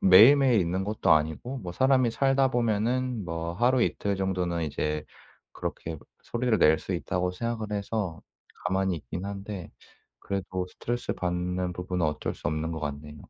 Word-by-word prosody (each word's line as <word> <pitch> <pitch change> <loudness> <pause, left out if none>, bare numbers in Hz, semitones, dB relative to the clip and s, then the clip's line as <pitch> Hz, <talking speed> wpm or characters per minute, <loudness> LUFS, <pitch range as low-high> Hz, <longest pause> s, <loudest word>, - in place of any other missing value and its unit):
매일매일 115 +5 +7
있는 90 +3 0
것도 105 +1 0
아니고 80 - 0
뭐 90 -6 -6
사람이 130 +2 +3
살다 135 +2 +3
보면은 120 0 0
뭐 85 0 -3
하루 120 +5 +3
이틀 100 -3 0
정도는 90 -3 -1
이제 75 0 -2 0.5
그렇게 80 -1 -5 0.2
소리를 120 -2 0
낼 80 +1 +5
수 95 - -5
있다고 90 +1 -1
생각을 110 +2 -3
해서 100 -4 -2 0.4
가만히 95 0 +1
있긴 90 +4 -6
한데 100 -3 -6 0.5
그래도 95 -2 -3
스트레스받는 90 -6 -2
부분은 90 -1 -2
어쩔 75 0 -2
수 - - -6
없는 80 +1 -2
것 80 - -4
같네요. 75 0 -5
95 Hz, 335 characters per minute, -28 LUFS, 85-115 Hz, 0.5 s, 매일매일